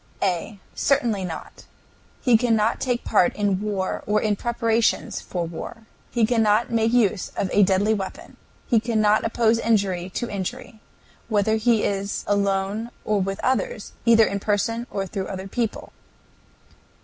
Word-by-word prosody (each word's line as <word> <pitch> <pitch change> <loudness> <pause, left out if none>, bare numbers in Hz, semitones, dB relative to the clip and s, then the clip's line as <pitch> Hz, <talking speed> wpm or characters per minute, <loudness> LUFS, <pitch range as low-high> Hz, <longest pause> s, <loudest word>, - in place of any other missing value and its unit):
A. 190 +2 -1 0.2
Certainly 235 -9 +1
not. 165 -3 -8 0.5
He 245 -3 +4
cannot 225 -1 +2
take 245 -2 0
any - - -10
part 195 -5 +3
in 200 -2 0
war 200 -3 -2
or 210 +1 +3
in 210 -1 +1
preparations 230 0 0
for 175 -2 -3
war. 195 +7 -8 0.2
He 235 -2 +2
cannot 225 -1 +2
make 225 0 +2
use 215 -5 +2
of 190 - -1
a 205 - +5
deadly 200 +2 +3
weapon. 220 - -6 0.3
He 235 - +3
cannot 215 -2 +2
oppose 225 0 +2
injury 195 -6 0
to 240 - -2
injury, 215 +2 -6 0.5
whether 220 0 +2
he 225 0 +2
is 200 0 -2
alone 200 +2 0 0.2
or 210 -2 +1
with 195 +1 -3
others, 485 - -1
either 225 -1 +6
in 200 - -2
person 230 +4 -1
or 195 -1 -3
through 190 0 -4
other 190 0 -6
people. 230 +2 -3
215 Hz, 150 wpm, -23 LUFS, 195-230 Hz, 0.5 s, either